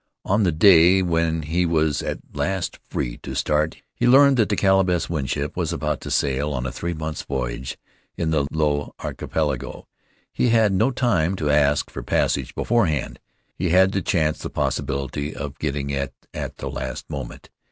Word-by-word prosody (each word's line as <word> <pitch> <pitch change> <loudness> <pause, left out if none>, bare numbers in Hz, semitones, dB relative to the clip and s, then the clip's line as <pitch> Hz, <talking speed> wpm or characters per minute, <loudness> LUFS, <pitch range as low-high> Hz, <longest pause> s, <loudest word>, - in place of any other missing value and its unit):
On 100 +3 +2
the 95 -4 +3
day 90 +2 +6
when 80 -2 0
he 85 +4 0
was 80 -3 +1
at - - -3 0.2
last 95 -2 -2
free - - -3
to - - -7
start 75 +1 0
he - - 0
learned 135 +1 +6
that 110 -4 +3
the 105 - +1
Caleb 95 -1 +3
S. 85 -1 0
Winship 70 -1 -2
was 85 -3 -1
about 75 -4 -2
to - - -6
sail 70 +1 0
on 60 -2 -3
a 65 - -2
three 85 +5 -4
months' 80 0 -4
voyage 65 -1 -4 0.4
in 80 -1 -1
the 70 -3 +1
Low 75 -2 -1
Archipelago. - - -3 0.5
He 125 - +2
had 110 -3 +4
no 110 +7 +3
time 100 -10 +1
to 75 -5 0
ask 75 0 +2
for - - -6
passage - - 0
beforehand. 90 - 0 0.3
He 90 0 -2
had 95 +2 +4
to 95 - 0
chance 80 -6 0
the - - -5
possi - - -1
bility 70 +2 -3
of 70 0 -6
getting 70 -2 -2
it 70 -1 -2 0.2
at - - -5
the - - -5
last - - -5
moment. 70 -5 -7
80 Hz, 185 wpm, -23 LUFS, 75-95 Hz, 0.5 s, day